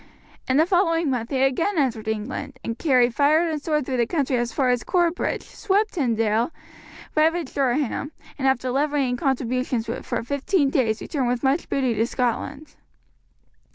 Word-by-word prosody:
In 260 - +3
the 315 - +5
following 335 -4 +2
month 240 -2 -2
he 265 -2 +1
again 330 +9 +1
entered 235 -7 0
England, 220 +5 -4 0.2
carried 250 -6 +3
fire 305 +6 +3
and 310 -2 -2
sword 300 -3 0
through 260 -1 -2
the 235 -1 +2
country 280 -4 0
as 240 -1 -1
far 255 +2 +1
as 245 -1 0
Corbridge, 350 -2 0
swept 420 +1 0
Tynedale, 230 - +1 0.7
ravaged 320 -1 +1
Durham, 275 +1 0 0.3
and 270 - +1
after 255 -1 +1
levying 280 -2 +1
contributions 250 -2 -1
for 235 0 -3
fifteen 280 +3 0
days 225 -5 +1
returned 270 -6 -2
with 245 -1 -1
much 275 +5 +1
booty 260 -3 +1
to 225 +1 +1
Scotland. 270 +4 -3
270 Hz, 155 wpm, -23 LUFS, 245-305 Hz, 0.7 s, the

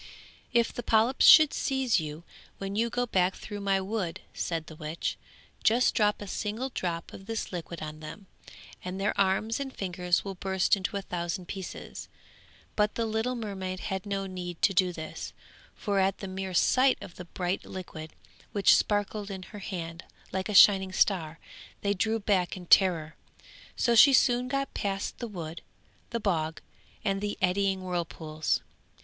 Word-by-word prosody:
'If 235 -1 +2
the - - -4
polyps 230 +3 +3
should 310 -2 +9
seize 265 -6 +1
you, 155 +1 -6 0.3
when 195 0 -4
you 230 +2 +1
go 245 +1 0
back 185 -4 +1
through 205 -1 -7
my 195 -1 +2
wood,' 190 -3 -3
said 165 -2 -2
the 160 - -11
witch, 155 +1 -3 0.5
'just 240 +3 +4
drop 210 -1 +2
a - - -8
single 215 +7 -3
drop 170 -8 -4
of 195 - -11
this 225 -1 -3
liquid 170 -2 -6
on 155 0 -7
them, 155 +6 -9 0.6
and 185 +1 -5
their 200 - 0
arms 200 +4 +1
and 275 -1 -4
fingers 180 -4 -1
will 195 - -4
burst 190 +1 +1
into 200 +1 -3
a 200 - -4
thousand 175 0 -3
pieces.' 190 -2 -7 0.7
But 210 0 +1
the 230 - 0
little 220 +3 -1
mermaid 190 -5 -4
had 190 +1 -3
no 195 -1 -2
need 180 -2 -6
to 195 - +5
do 185 -1 +3
this, 160 -2 -7 0.4
for 200 -2 0
at 190 +1 +2
the 195 - -6
mere 190 0 -4
sight 260 +8 +4
of - - -11
the 180 - -8
bright 180 +2 -2
liquid, 160 -4 -8 0.4
which 200 -2 +6
sparkled 205 0 0
in 190 -2 -6
her 205 - -7
hand 170 -4 -6 0.3
like 190 +1 -2
a 210 - -2
shining 190 -1 +7
star, 165 -5 +1 0.4
they 200 0 +1
drew 220 +4 0
back 195 -4 +1
in 180 - -9
terror. 165 -4 +4 0.6
So 235 - +2
she 270 +5 +8
soon 250 -1 +4
got 275 +1 -2
past 195 -1 -3
the 240 - -4
wood, 170 -6 -7 0.5
the 235 - -2
bog, 160 -6 -1 0.5
and 195 -1 0
the 205 0 -2
eddying 190 +1 +1
whirlpools. 165 -3 -2
195 Hz, 170 wpm, -29 LUFS, 180-210 Hz, 0.7 s, should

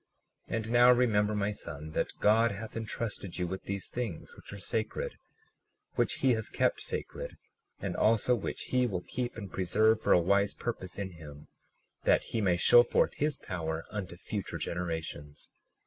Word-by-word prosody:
37:14 - - -1
And 110 0 -2
now 120 +1 +7
remember, 110 -4 +3
my 105 0 0
son, 75 -6 -6
that - - -2
God 115 +2 +5
has 110 +2 -7
entrusted 110 -4 -4
you 90 - 0
with 95 +2 -5
these 100 -1 -3
things, 120 -9 -5
which - - -12
are 100 - -7
sacred, 110 +3 -3 0.7
which - - +1
he 130 - +6
has 110 -1 -1
kept - - +1
sacred, - - -5 0.4
and - - -3
also 115 +3 +3
which 115 -5 -3
he 125 -1 +3
will 90 -5 -3
keep 120 -2 -3
and 100 -4 -7
preserve 110 +4 +3
for - - +1
a - - +6
wise 100 +3 +2
purpose 95 -6 -4
in 100 -2 -3
him, 75 -4 -12 0.5
that - - +4
he 115 - -1
may 90 -4 +3
show 120 +6 +8
forth - - +2
his 150 0 0
power 80 -3 -4
unto 100 -4 -5
future 100 +2 -4
generations. 80 -4 -5
100 Hz, 175 wpm, -31 LUFS, 90-115 Hz, 0.7 s, show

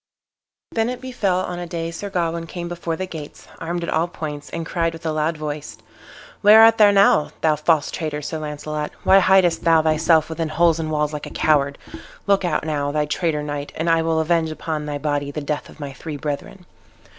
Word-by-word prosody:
Then 225 +1 0
it 250 - -4
befell 205 -8 -1
on 180 -1 -4
a 175 - -5
day 165 0 -4
Sir 200 +4 -6
Gawain 170 -3 -2
came 175 +1 -6
before 170 -1 -4
the 185 - -3
gates, 160 -5 -10
armed 170 +1 -3
at - - -3
all 160 +2 +1
points, 150 -4 -7
and 165 0 -5
cried 165 0 -1
with 165 0 -11
a 160 - 0
loud 155 +1 -1
voice, 150 -1 -6 0.6
"Where 215 +2 +8
art 225 0 +6
thou 210 -1 +8
now, 195 -6 +4
thou 155 -1 +3
false 155 -1 +1
traitor, 155 -3 -3
Sir 160 +2 -4
Launcelot? 150 0 -4
Why 195 - +6
hidest 185 -3 +3
thou 165 -1 +4
thyself 160 0 +3
within 160 0 -3
holes 165 +1 +2
and 160 -1 -3
walls 150 -1 -1
like 150 - -5
a - - -7
coward? 140 -2 +1 0.5
Look 200 -1 +2
out 170 -3 -1
now, 145 -2 -1
thou 150 0 0
traitor 150 0 -1
knight, 145 -1 -5
and 160 - -2
I 165 0 +3
will 160 0 +1
avenge 160 0 +1
upon 155 -1 -4
thy 145 -1 -3
body 145 -1 -2
the 145 - -4
death 150 0 -4
of - - -16
my 140 -2 -6
three 150 +1 -7
brethren." 155 +6 -5
160 Hz, 215 wpm, -21 LUFS, 150-175 Hz, 0.6 s, Where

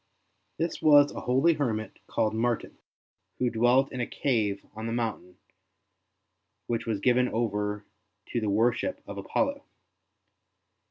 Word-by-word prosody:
This 165 +2 -2
was 145 -2 +6
a - - -6
holy 135 +7 +3
hermit 115 -8 -3
called 110 0 0
Martin, 115 +1 -1 0.6
who 125 -1 0
dwelt 120 +4 +3
in 125 - -3
a 120 - -2
cave 105 -7 -1
on 110 +1 -5
the - - -2
mountain 110 -6 -3 1.3
which 115 -1 -2
was 110 -3 -1
given 125 +3 +3
over 105 -2 -2 0.4
to 120 - -1
the 105 - -1
worship 120 - +1
of - - -7
Apollo. 280 0 -1
120 Hz, 130 wpm, -28 LUFS, 110-130 Hz, 1.3 s, was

